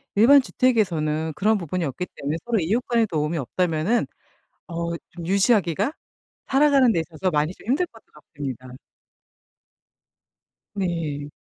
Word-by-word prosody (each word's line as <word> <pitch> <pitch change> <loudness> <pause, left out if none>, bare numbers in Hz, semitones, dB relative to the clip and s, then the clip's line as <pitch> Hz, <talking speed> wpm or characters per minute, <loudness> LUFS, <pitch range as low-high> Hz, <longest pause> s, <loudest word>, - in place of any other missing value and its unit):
일반 275 +7 +7
주택에서는 165 -12 0
그런 215 +6 +2
부분이 180 0 -3
없기 155 +4 -3
때문에 145 +3 -3
서로 235 -2 +1
이웃 200 +9 +1
간의 235 -2 +3
도움이 155 0 -1
없다면은 170 - 0 0.6
어 170 0 -3 0.2
좀 170 -1 -8
유지하기가 200 - +2 0.6
살아가는 275 -3 +4
데 165 -6 +1
있어서 165 +3 -3
많이 155 +2 0
좀 - - -18
힘들 290 +9 +2
것도 225 -6 -19
같습니다. 140 -4 -8 2.1
네. 165 -7 -2
175 Hz, 300 characters per minute, -23 LUFS, 155-225 Hz, 2.1 s, 일반